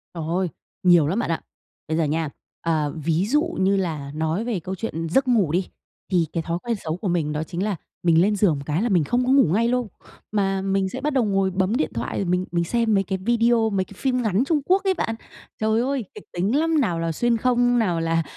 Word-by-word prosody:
Trời 165 - -4
ơi! 180 +1 0 0.3
Nhiều 175 -5 +6
lắm 195 +8 0
bạn - - -2
ạ! 165 - -1 0.5
Bây 160 +1 -1
giờ 165 - +2
nha, 155 0 -1 0.3
à, 155 -3 0
ví 165 +4 0
dụ 295 +8 +2 0.2
như 195 +1 +3
là 155 -7 -3
nói 160 +7 -1
về 225 -7 -1
câu 185 +4 -5
chuyện 165 -7 -4
giấc 265 +8 +2
ngủ 210 -11 +3
đi, 180 +2 0 0.4
thì 175 -3 +3
cái 165 -2 -1
thói 170 +2 -2
quen 235 -1 -1
xấu 160 +1 -2
của 195 - -4
mình 165 -4 0
đó 155 +1 -1
chính 175 +3 -4
là 210 -3 0 0.3
mình 165 -1 +5
lên 205 +2 +3
giường 190 -6 +3
một 140 - -5
cái 155 +5 0
là 240 - 0
mình 175 -6 +3
không 245 - 0
có 260 - +2
ngủ 275 0 +6
ngay 230 +3 +2
lâu, 245 -2 0 0.4
mà 195 -2 0
mình 195 0 0
sẽ 260 +6 -6
bắt 300 0 -1
đầu 260 -3 +3
ngồi 195 -1 +1
bấm 190 +4 0
điện 155 - 0
thoại, 115 +1 -3
rồi 195 - -1
mình 180 +1 0
mình 170 -1 +1
xem 230 +3 +1
mấy 195 - +3
cái 190 0 -2
video, 230 +2 +2
mấy 190 -2 0
cái - - -14
phim 255 -2 0
ngắn 215 +1 +1
Trung 310 -1 +2
Quốc 380 +2 +3
ấy 385 -1 +2
bạn. 225 -10 -2 0.5
Trời 220 +1 +2
ơi! 265 -3 -1
Kịch - - -10
tính 195 +9 0
lắm! 320 -1 +2
Nào 175 -8 0
là 165 0 -1
xuyên 235 +7 +1
không, 245 0 +2
nào 175 -7 +1
là 165 0 +1
190 Hz, 255 wpm, -23 LUFS, 165-235 Hz, 0.5 s, Nhiều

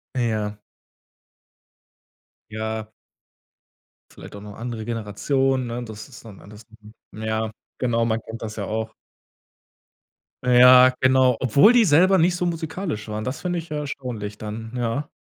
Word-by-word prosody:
Ja. 110 -4 -1 1.9
Ja. 110 0 -4 1.2
Vielleicht - - -12
auch 100 - -9
noch 105 -1 -10
andere 115 -1 -5
Generation, 125 +4 -1
ne? 120 +1 -4
Das 110 +2 -10
ist 120 - -14
dann 105 -4 -12
anders. 105 +2 -14 0.5
Mhm. 110 - -8
Ja, 110 0 -1 0.3
genau. 115 -2 +1
Man 115 -1 0
kennt 115 +1 -9
das 110 -1 -6
ja 100 - -3
auch. 110 +2 -4 1.5
Ja, 125 +1 +7
genau, 130 -2 +4
obwohl 140 - +5
die 240 -3 +5
selber 185 +5 +5
nicht 175 +1 +3
so 180 0 -1
musikalisch 160 - -4
waren. 105 0 -4
Das 130 +4 -4
finde 175 -1 -2
ich 165 -1 -10
ja 150 - -3
erstaunlich 120 -8 -6
dann, 110 +1 -7
ja. 125 +4 -2
120 Hz, 140 wpm, -23 LUFS, 110-135 Hz, 1.9 s, Ja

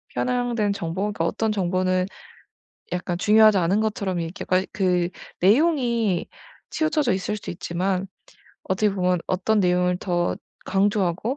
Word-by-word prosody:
편향된 245 -5 0
정보가 195 +4 -3
어떤 220 -1 0
정보는 185 -1 0 0.9
약간 180 -1 -2
중요하지 215 +2 +5
않은 185 +3 +2
것처럼 205 -4 -1
이렇게 165 +2 -5
거의 185 +1 +1
그 180 -3 +1 0.3
내용이 235 - +2 0.4
치우쳐져 310 -5 +1
있을 195 +3 -2
수 - - -8
있지만 180 +2 -2 0.6
어떻게 205 +3 +1
보면 180 -1 +1
어떤 200 +3 +1
내용을 180 0 +2
더 175 -2 -1 0.3
강조하고 200 - 0
190 Hz, 295 characters per minute, -23 LUFS, 180-215 Hz, 0.9 s, 중요하지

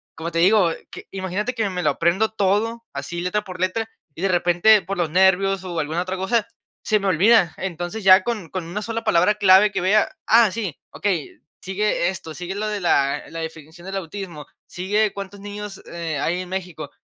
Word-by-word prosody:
como 165 +1 -5
te 165 - -3
digo, 185 0 +5 0.2
que - - -10
imagínate 195 +5 -3
que 220 -3 0
me 180 -1 -3
lo 150 - +3
aprendo 175 +9 +1
todo, 220 +3 0
así 155 +5 -5
letra 210 +4 -1
por 185 -2 -9
letra, 220 +5 -1 0.3
y 170 - -8
de 195 - +2
repente, 175 +4 +4
por 195 0 -4
los 165 -3 0
nervios, 190 +1 +3
o 175 -3 -4
alguna 160 +3 -1
otra 185 +1 -4
cosa, 205 +4 0 0.4
se 215 -1 +2
me 200 - -2
olvida. 190 +1 +4
Entonces, 180 +3 -5
ya 190 0 +7
con 215 -8 -3
con 185 -3 -4
una 175 +6 -4
sola 230 +1 -3
palabra 180 +4 +3
clave, 200 0 +6
que - - -2
vea: 205 +3 +3 0.2
"Ah, 225 -2 +6
sí, 200 -8 -4
okey. 185 -7 -2 0.2
Sigue 190 -2 0
esto. 165 -4 -6
Sigue 180 +2 -5
lo 215 +1 -2
de 210 -2 -3
la 140 -5 +2
la 165 - -7
definición 160 +2 -9
del 195 0 -4
autismo. 170 -4 -7 0.2
Sigue 205 +4 0
cuántos 200 0 -8
niños, 205 -1 -7
eh, 165 -3 -4
hay 175 +5 -1
en 180 - -8
México". 180 -6 -5
190 Hz, 200 wpm, -22 LUFS, 175-210 Hz, 0.4 s, ya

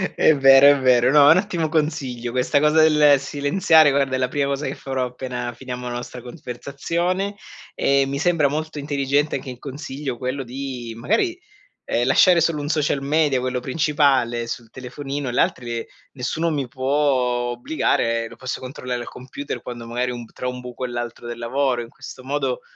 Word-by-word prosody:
È 155 - +5
vero 135 0 +8
è - - -5
vero. 125 -1 +4
No, 145 -1 +7
un 165 - +7
ottimo 180 -5 -1
consiglio 145 -7 -2
questa 130 +4 +1
cosa 150 +1 +4
del 150 -2 +5
silenziare, 145 +3 +3
guarda, 135 -1 +1
è - - 0
la 130 - +1
prima 140 +1 0
cosa 140 +1 -2
che 130 - -2
farò 130 -1 -3
appena 125 -1 -5
finiamo 125 0 -7
la 120 - -4
nostra 120 +1 -7
conversazione. 170 - -3 0.4
E 140 0 +2
mi 140 +1 -3
sembra 165 -3 +2
molto 155 +1 -4
intelligente 145 +1 0
anche 135 -1 -5
in 125 - -8
consiglio 140 -1 -6
quello 130 +2 -3
di 125 -2 -6
magari, 225 - 0 0.5
ehm, 120 +1 0
lasciare 175 +6 +5
solo 160 -2 +1
1 145 - -4
social 150 -3 0
media, 145 -1 +2
quello 125 0 -2
principale 130 -4 +1
sul 115 -1 -6
telefonino, 135 +3 -6
e - - -2
l'altri 120 -2 -1 0.3
nessuno 155 +6 -2
mi 140 -4 -2
può 130 +2 -5 0.6
obbligare, 115 -3 0
lo - - -12
posso 130 0 -5
controllare 125 -1 -5
al - - -7
computer 135 +3 -7
quando 120 -1 -8
magari 125 +2 -2
ho - - -5
un 120 -1 -7
tra 125 - -5
un 125 0 -4
buco 125 +1 -6
e - - -2
l'altro 120 0 -5
del 120 0 -6
lavoro. 125 +1 0
In 115 - -9
questo 130 - -11
modo, 135 -2 -2
135 Hz, 185 wpm, -22 LUFS, 125-145 Hz, 0.6 s, vero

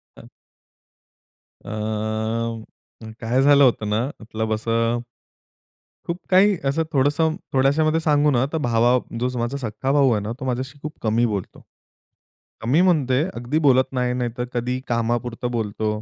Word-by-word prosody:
हां. - - -14 1.4
अ, - - -8 1.5
काय 120 +3 +1
झालं 140 0 +6
होतं 110 -5 +2
ना, 110 +3 +1 0.2
मतलब 110 0 -3
असं 115 +2 0 1.1
खूप 170 - -2
काही 195 +1 +5
असं 140 +4 +1
थोडंसं 145 +4 +2 0.2
थोड्याशामध्ये 150 +4 +3
सांगू 150 -2 +3
ना, 130 0 +2
तर - - +1
भावा 120 +2 +3 0.2
जो 125 +1 0
माझा 120 +4 -2
सख्खा 130 +1 -3
भाऊ 140 -3 +4
आहे 105 - +1
ना, 105 - -4
तो 130 - -5
माझ्याशी 130 +3 -3
खूप 155 0 -5
कमी 115 +2 +2
बोलतो. 100 -5 -4 1.0
कमी 130 +9 +3
म्हणजे, 145 -7 +3
अगदी 120 +6 -1
बोलत 130 0 +4
नाही, 125 -1 0
नाहीतर 120 -1 -3
कधी 125 +1 -1
कामापुरतं 120 +1 -1
बोलतो. 105 -2 -2
125 Hz, 140 wpm, -22 LUFS, 115-145 Hz, 1.5 s, झालं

